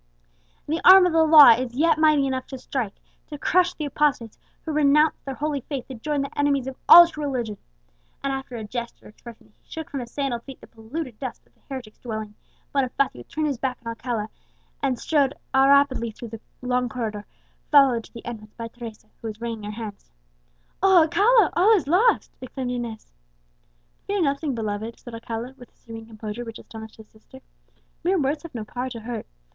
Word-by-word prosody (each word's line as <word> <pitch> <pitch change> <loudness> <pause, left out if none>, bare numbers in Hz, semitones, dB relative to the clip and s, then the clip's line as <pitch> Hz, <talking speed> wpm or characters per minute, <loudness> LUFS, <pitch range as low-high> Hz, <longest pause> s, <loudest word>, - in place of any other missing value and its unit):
The 320 +3 -1
arm 375 0 +9
of 360 - +1
the 325 - +4
law 305 -5 +9
is 240 +1 0
yet 315 +2 +3
mighty 305 -3 +4
enough 260 -1 -3
to 265 - -7
strike 250 -5 -4 0.3
to 295 - -7
crush 360 +4 +2
the 305 - -4
apostates 275 -6 -1 0.3
who 320 - -3
renounce 300 +1 +3
their 270 -1 -5
holy 295 -1 -2
faith 270 -1 -6
to - - -6
join 285 +4 -2
the 275 - -8
enemies 280 -2 +2
of 265 0 -6
all 345 +1 +12
true 305 -3 -7
religion!" 240 -7 -3 0.6
And 275 -1 -1
after 265 -2 -6
a 225 - -5
gesture 235 +2 -7
expressing 225 +1 -14
that - - -31
he - - -36
shook 320 -1 -7
from 280 - -3
his 240 -2 -7
sandalled 265 -3 -3
feet 270 +1 -11
the - - -14
polluted 235 +2 -7
dust 260 -4 -7
of - - -33
the - - -36
heretic's 250 -6 -8
dwelling, 215 -3 -6 0.4
Bonifacio 265 - 0
turned 310 0 -2
his 280 -5 -2
back 255 -1 -2
on - - -3
Alcala, 230 -2 -4 0.5
and 265 -3 0
strode 285 0 +1 0.2
rapidly 270 -2 +4
through 225 +2 -9
the 225 0 -9 0.2
long 250 0 0
corridor, 215 -3 -5 0.4
followed 270 -5 +5
to - - -19
the 230 - -10
entrance 215 -3 -8
by 230 -1 -6
Teresa, 230 -3 -10 0.2
who 230 - -5
was 215 -1 -7
wringing 230 -2 -5
her 225 +2 -7
hands. 205 -2 -9 0.7
"O 380 -3 +6
Alcala! 410 +6 +4
all 415 +6 +5
is 365 - 0
lost!" 380 - +2
exclaimed 255 0 -5
Inez. 235 -3 -6 1.0
"Fear 400 -2 0
nothing, 280 -1 -1
beloved," 220 +1 -4
said 240 - -11
Alcala, 230 +2 -6
with 245 - -14
a - - -39
serene 225 -1 -10
composure 215 +1 -7
which 225 -1 -8
astonished 220 -1 -11
his 220 -1 -15
sister, 240 +4 -17 0.6
"mere 365 +2 +2
words 290 +1 0
have 335 -5 -11
no 225 - -4
power 250 +4 -4
to 235 -3 -8
hurt. 230 0 -6
255 Hz, 200 wpm, -24 LUFS, 230-295 Hz, 1.0 s, all